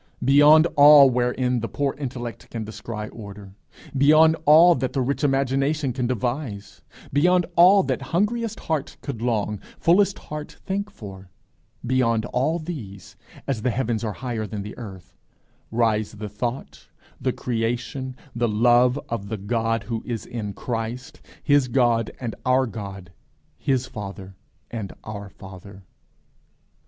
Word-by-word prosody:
Beyond 145 +4 +7
all 145 -2 +8
wherein 125 0 0
the 115 - -3
poor 140 +2 -1
intellect 125 -4 -6
can 115 -2 -5
descry 105 0 -6
order; 100 -3 -10 0.4
beyond 155 +4 +6
all 165 +4 +8
that 130 -3 -2
the 135 - 0
rich 140 +4 -2
imagination 135 +1 +1
can 125 -1 -1
devise; 120 -3 -4 0.3
beyond 175 +5 +3
all 190 +3 +7
that - - -2
hungriest 220 +5 -1
heart 155 -4 -3
could 135 -6 -6
long, 105 -3 -1 0.2
fullest 195 +4 +3
heart 150 0 -8
thank 200 +2 -2
for 95 - -11 0.6
beyond 115 -3 +1
all 135 +7 0
these, 130 - -8 0.3
as 130 -6 -2
the 125 - +1
heavens 120 -2 -1
are 110 -2 -2
higher 115 -3 -4
than 105 -1 -5
the 105 - -8
earth, 95 -6 -10 0.5
rise 110 -2 0
the 105 0 -7
thought, 120 +5 -5 0.3
the - - +1
creation, 120 +3 -3 0.2
the 120 -1 +1
love 120 +4 +4
of 105 -4 -4
the 110 - -3
God 115 +2 -1
who 115 -2 -4
is 115 -4 -5
in 110 -4 -5
Christ, 115 +2 -5 0.2
his 145 -3 +3
God 120 -2 +2
and 120 -3 -4
our 130 +1 +3
God, 100 -5 -8 0.5
his 130 -2 0
Father 100 -5 -8 0.4
and 110 -5 -5
our 100 -2 -7
Father. 95 +1 -12
120 Hz, 140 wpm, -23 LUFS, 110-140 Hz, 0.6 s, all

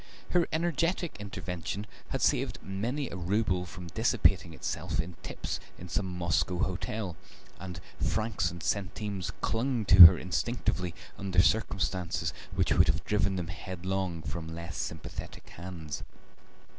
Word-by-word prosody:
Her 175 -2 +3
energetic 170 +1 0
intervention 100 -1 -5 0.2
had - - -2
saved - - +2
many 120 +9 -2
a - - -5
rouble 90 0 0
from 90 +1 -9
dissipating 85 - +2
itself - - -3
in 85 +2 -2
tips - - -4 0.2
in 90 - -9
some 95 +2 -1
Moscow 90 0 0
hotel, 95 +1 -2 0.4
and 90 -2 -6 0.2
francs 110 -5 0
and 85 -2 -8
centimes 100 -1 -2
clung 120 -1 0
to 95 -3 +13
her - - +2
instinctively 90 -2 -1 0.2
under 95 -2 0
circumstances 95 -5 0 0.2
which - - +2
would - - +5
have - - +1
driven 100 -2 +1
them 90 -2 -3
headlong 95 -2 -3
from 80 -1 -5
less 85 -3 -6
sympathetic 80 -2 -6
hands. 85 -4 -6
95 Hz, 130 wpm, -30 LUFS, 85-105 Hz, 0.4 s, to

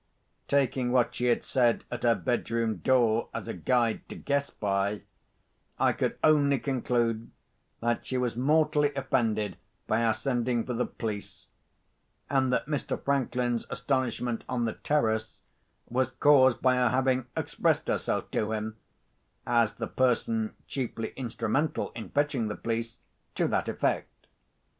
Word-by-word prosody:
Taking 130 -3 +1
what 125 -2 +3
she 125 - -2
had 120 - +2
said 120 -3 +2
at 120 - -4
her 120 -1 +4
bedroom 115 -3 -1
door 120 -4 +2
as - - -4
a - - -3
guide 120 -3 +1
to - - -7
guess 140 0 -1
by, 100 0 -1 0.8
I - - +4
could - - -1
only 145 -2 +5
conclude 120 -4 -1 0.5
that 120 0 0
she 130 - -1
was 125 -2 -1
mortally 150 +2 +3
offended 115 -7 0 0.3
by 110 +2 +1
our 110 -2 +3
sending 120 -3 0
for 125 - -3
the 125 +1 0
police, 105 -3 -6 0.9
and 135 -2 +2
that 125 - +1
Mr. 145 0 -2
Franklin's 125 -3 0
astonishment 125 -3 -1
on 125 -2 0
the 110 - -1
terrace 110 -7 -1 0.5
was 130 +1 0
caused 130 -2 +4
by 130 -1 +4
her 125 -1 +3
having 130 0 +1
expressed - - 0
herself - - -1
to 110 +1 0
him 110 0 -4 0.7
(as 115 -3 +2
the 115 - -3
person 215 - 0
chiefly 120 -4 -4
instrumental 130 +4 -1
in 115 -1 -8
fetching 145 -6 0
the 105 - -3
police) 115 0 -3 0.4
to - - +1
that - - 0
effect. - - -2
125 Hz, 145 wpm, -28 LUFS, 115-135 Hz, 0.9 s, only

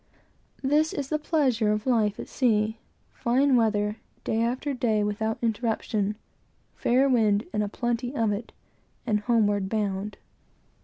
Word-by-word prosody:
This 300 +4 +2
is 275 -2 -3
the 305 - 0
pleasure 260 -9 +1
of 210 +1 -1
life 220 -5 +1
at - - -6
sea, 220 -3 +1 0.3
fine 265 +2 +2
weather, 210 -2 +1 0.3
day 225 - 0
after 255 +5 -1
day, 220 -5 +1
without 220 +2 -1
interruption, 220 -2 -1 0.6
fair 260 +3 +2
wind, 215 -5 +3
and 210 - +1
a 205 - -1
plenty 240 +3 -2
of 225 -4 +1
it, 205 +3 -4 0.5
and 215 -3 +1
homeward 205 -3 +1
bound. 205 -1 -2
225 Hz, 140 wpm, -26 LUFS, 210-250 Hz, 0.6 s, wind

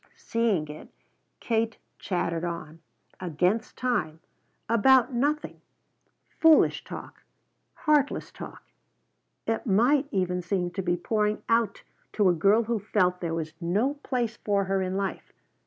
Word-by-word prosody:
Seeing 220 -9 0
it, 150 +1 -10 0.5
Katie 225 -1 0 0.2
chattered 170 -3 -2
on, 165 -2 -5 0.4
against 180 +5 -1
time, 240 -11 -1 0.5
about 250 +3 +4
nothing; 290 +5 -1 0.8
foolish 320 -1 +5
talk, - - -9 0.5
heartless 295 -2 +1
talk, - - -10 0.8
it 225 +3 -2
might 250 +8 +3
even 180 -2 -1
seem, 180 0 -1
to 195 - -3
be 175 -1 0
pouring 210 +3 0
out 230 -3 +1 0.3
to 205 -3 +3
a - - +4
girl 200 +7 +4
who 230 0 -1
felt 185 -3 +1
there 165 -2 -2
was 160 -1 -4
no 205 +11 +1
place 240 -5 -2
for 200 -1 0
her 195 0 0
in 185 0 -2
life. 195 -1 -4
200 Hz, 130 wpm, -27 LUFS, 180-230 Hz, 0.8 s, foolish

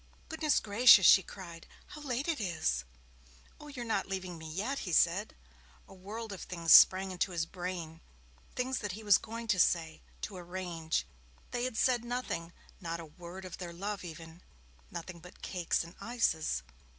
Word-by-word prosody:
'Goodness 315 -3 +2
gracious,' 210 -2 +7
she 190 - +9
cried, 170 -3 -10 0.2
'how 300 - -10
late 270 0 -2
it 320 -8 -1
is!' 160 - -1 0.7
'Oh, 300 - -11
you're 260 -5 -6
not 220 -4 -1
leaving 185 -2 -4
me 160 0 -8
yet!' 210 - -2
he 180 - -5
said. 180 +6 +2 0.5
A - - -14
world 205 +3 -7
of 190 - -8
things 170 -2 +2
sprang 190 0 +7
to 185 +1 0
his 165 -2 -1
brain, 175 -3 -6 0.5
things 255 +1 -1
that 205 -4 -4
he 220 +3 -8
was 205 -2 +6
going 230 +1 -7
to 190 -3 +2
say 165 -2 +2 0.2
to 200 - -5
arrange. 175 - -3 0.5
They 245 0 -1
had 255 -3 -4
said 245 -2 +2
nothing 240 -9 -4 0.3
not 170 -1 -4
a 165 - -7
word 175 +4 -10
of 185 - -8
their 175 -2 -6
love 200 +3 -4
even; 165 0 -10 0.5
nothing 170 +1 -7
but 180 +2 -15
cakes 175 -3 -1
and 170 +1 -12
ices. 160 - 0
185 Hz, 175 wpm, -32 LUFS, 170-225 Hz, 0.7 s, she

